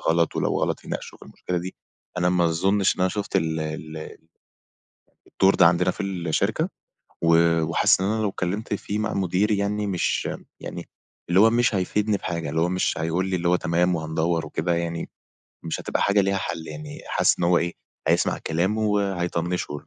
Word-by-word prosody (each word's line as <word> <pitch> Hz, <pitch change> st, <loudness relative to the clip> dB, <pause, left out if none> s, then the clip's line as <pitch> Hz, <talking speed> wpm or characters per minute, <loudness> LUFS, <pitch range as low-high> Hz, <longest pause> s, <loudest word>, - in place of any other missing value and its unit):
غلط 85 Hz, 0 st, +1 dB
ولو -, -, 0 dB
غلط -, -, -1 dB
يناقشوا -, -, -6 dB
في -, -, -14 dB
المشكلة 90 Hz, -, -4 dB
دي، 90 Hz, +2 st, -6 dB, 0.4 s
أنا 90 Hz, 0 st, +2 dB
ما 90 Hz, -1 st, +2 dB
أظنش 95 Hz, +4 st, +2 dB
إن -, -, -6 dB
أنا 90 Hz, -, +3 dB
شُفت 105 Hz, -1 st, -2 dB
ال 80 Hz, 0 st, 0 dB
ال 80 Hz, 0 st, -6 dB, 1.2 s
الدور 95 Hz, +1 st, +6 dB
ده 90 Hz, -, +6 dB
عندنا 90 Hz, +1 st, +2 dB
في -, -, -5 dB
الشركة 90 Hz, -5 st, -1 dB, 0.5 s
و 85 Hz, 0 st, +4 dB
وحاسِس 80 Hz, +3 st, +3 dB
إن 95 Hz, -, 0 dB
أنا 110 Hz, +1 st, 0 dB
لو 105 Hz, -, +1 dB
اتكلّمت 100 Hz, +3 st, -3 dB
فيه 105 Hz, +1 st, -3 dB
مع 110 Hz, 0 st, -1 dB
مديري 100 Hz, +2 st, +1 dB
يعني 105 Hz, +1 st, -1 dB
مش 90 Hz, -3 st, 0 dB, 0.3 s
يعني -, -, -7 dB, 0.4 s
اللي 90 Hz, +3 st, +4 dB
هو 115 Hz, -, +7 dB
مش 120 Hz, -1 st, +2 dB
هيفيدني 105 Hz, +3 st, +1 dB
بحاجة، 85 Hz, -5 st, -4 dB
اللي 80 Hz, +2 st, 0 dB
هو 85 Hz, -, +2 dB
مش 90 Hz, 0 st, 0 dB
هيقول 85 Hz, +3 st, 0 dB
لي 95 Hz, -1 st, 0 dB
اللي 85 Hz, 0 st, 0 dB
هو 90 Hz, -, +4 dB
تمام 90 Hz, +1 st, +1 dB
وهندوّر 80 Hz, 0 st, -1 dB
وكده 85 Hz, +3 st, -1 dB
يعني، 85 Hz, 0 st, -3 dB, 0.6 s
مش 80 Hz, -, -3 dB
هتبقى -, -, -1 dB
حاجة 100 Hz, +1 st, +3 dB
ليها 100 Hz, 0 st, +1 dB
حَل 85 Hz, -3 st, -4 dB
يعني 150 Hz, -1 st, -8 dB
حاسِس -, -, +2 dB
إن 85 Hz, -, 0 dB
هو 85 Hz, 0 st, +4 dB
إيه، 85 Hz, 0 st, -1 dB, 0.4 s
هيسمع -, -, +2 dB
كلامه 95 Hz, +7 st, 0 dB
وهيطنّشه 90 Hz, -6 st, -1 dB
90 Hz, 185 wpm, -24 LUFS, 85-100 Hz, 1.2 s, هو